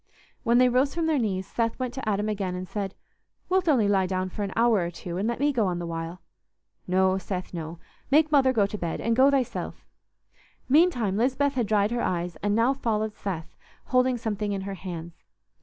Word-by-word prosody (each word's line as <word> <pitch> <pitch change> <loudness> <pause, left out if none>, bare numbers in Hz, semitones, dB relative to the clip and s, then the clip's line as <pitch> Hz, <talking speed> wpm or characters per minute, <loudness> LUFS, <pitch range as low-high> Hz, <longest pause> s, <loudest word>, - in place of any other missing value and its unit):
When 235 +1 +3
they 250 0 +6
rose 255 +4 +2
from 335 -1 0
their 315 -3 +2
knees, 190 -5 -1
Seth 230 +3 -1
went 255 -1 -3
to 260 -4 -3
Adam 205 +1 0
again 195 -4 -2
and 180 0 -5
said, 195 -1 -4 0.5
"Wilt 370 -2 +2
only 240 -8 +4
lie 195 -2 +2
down 185 0 -1
for 205 - -6
an 200 -1 -2
hour 230 -2 +4
or 170 -1 -1
two, 175 0 -6
and 200 +4 0
let 235 - -2
me 290 +1 +2
go 225 -6 +2
on 180 -1 -1
the 175 - -4
while?" 165 +2 -5 0.6
"No, 190 +1 +2
Seth, 185 -1 -5
no. 165 0 -5 0.3
Make 305 +2 +4
Mother 270 -3 +5
go 220 -5 +3
to 205 +1 -4
bed, 170 -2 -3
and 230 0 +1
go 265 +3 +6
thyself." 270 -3 -2 0.8
Meantime 255 - +3
Lisbeth 270 +4 +1
had 245 -5 0
dried 210 0 +2
her 240 0 0
eyes, 175 -1 -1
and 205 +4 0
now 235 +4 +3
followed 220 -5 -1
Seth, 175 -7 -5 0.3
holding 255 -1 +2
something 210 -2 -2
in 195 - -2
her 195 +1 -5
hands. 170 -2 -7
210 Hz, 210 wpm, -26 LUFS, 185-255 Hz, 0.8 s, they